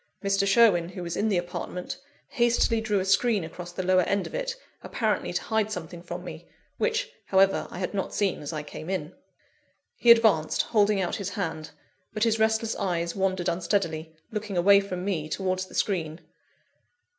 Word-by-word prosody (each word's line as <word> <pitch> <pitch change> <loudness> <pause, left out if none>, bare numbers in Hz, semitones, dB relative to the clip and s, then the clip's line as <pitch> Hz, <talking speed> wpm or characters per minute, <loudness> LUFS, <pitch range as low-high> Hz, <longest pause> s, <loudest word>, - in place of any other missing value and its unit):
Mr. 195 0 +2
Sherwin, 195 -5 +4
who 180 -1 -7
was 170 -1 -4
in 220 - +1
the 195 - +2
apartment, 175 0 -5 0.3
hastily 235 -2 +2
drew 210 -2 0
a 185 - -2
screen 200 +1 +2
across 175 +2 -8
the 185 +2 -4
lower 185 0 +4
end 200 +2 0
of - - -8
it, - - -2 0.3
apparently - - -1
to - - -1
hide 220 -1 0
something 175 -3 -6
from 175 - -7
me; - - -9 0.3
which, 475 +1 0 0.2
however, 195 0 +3
I - - -9
had 185 +2 -3
not 195 -2 -2
seen 200 -3 0
as 145 - -5
I 155 -2 -4
came 155 +3 -8
in. 180 -3 -3 0.8
He 240 - +2
advanced, 220 -10 +5
holding 210 -2 +2
out 180 -2 -1
his 200 -2 -3
hand; 160 -7 -4 0.4
but 215 0 0
his 225 -1 +2
restless 220 0 +1
eyes 170 -3 -1
wandered 190 -2 0
unsteadily, 170 -2 -1 0.2
looking 210 -3 -4
away 200 +3 +6
from 185 -2 -4
me 160 -6 -2
towards 185 +1 -2
the - - -13
screen. 165 -4 -1
190 Hz, 180 wpm, -27 LUFS, 175-215 Hz, 0.8 s, away